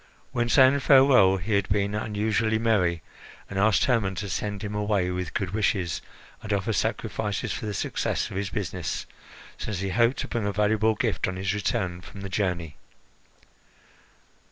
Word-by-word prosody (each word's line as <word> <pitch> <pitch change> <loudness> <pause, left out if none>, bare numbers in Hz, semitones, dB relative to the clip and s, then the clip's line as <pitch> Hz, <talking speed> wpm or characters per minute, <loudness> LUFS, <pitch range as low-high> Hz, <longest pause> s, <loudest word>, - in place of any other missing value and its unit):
When 120 -1 0
saying 130 +3 +6
farewell, 130 -9 +6
he 95 +4 -3
had 100 -1 +1
been 100 0 +1
unusually 110 +1 0
merry, 95 -8 +1 0.4
and 95 - -4
asked 105 0 +4
Hermon 110 -7 +1
to 100 +1 -4
send 105 +1 -3
him 105 0 -4
away 105 -3 0
with 90 -2 -4
good 95 -3 -1
wishes 100 -5 0 0.4
and 105 - -6
offer 100 +2 0
sacrifices 105 0 -2
for 110 - -5
the 105 - -3
success - - -2
of - - -7
his 100 0 -2
business, 95 -4 -3 0.5
since 95 -4 -4
he 100 - -2
hoped 120 +5 +2
to - - -3
bring 115 -4 -2
a - - 0
valuable 110 +1 +2
gift 110 -1 -1
on 95 - -3
his 95 +1 -1
return 95 -3 -2
from 100 +2 -11
the 95 - -6
journey. 90 -6 -2
105 Hz, 170 wpm, -26 LUFS, 95-110 Hz, 0.5 s, saying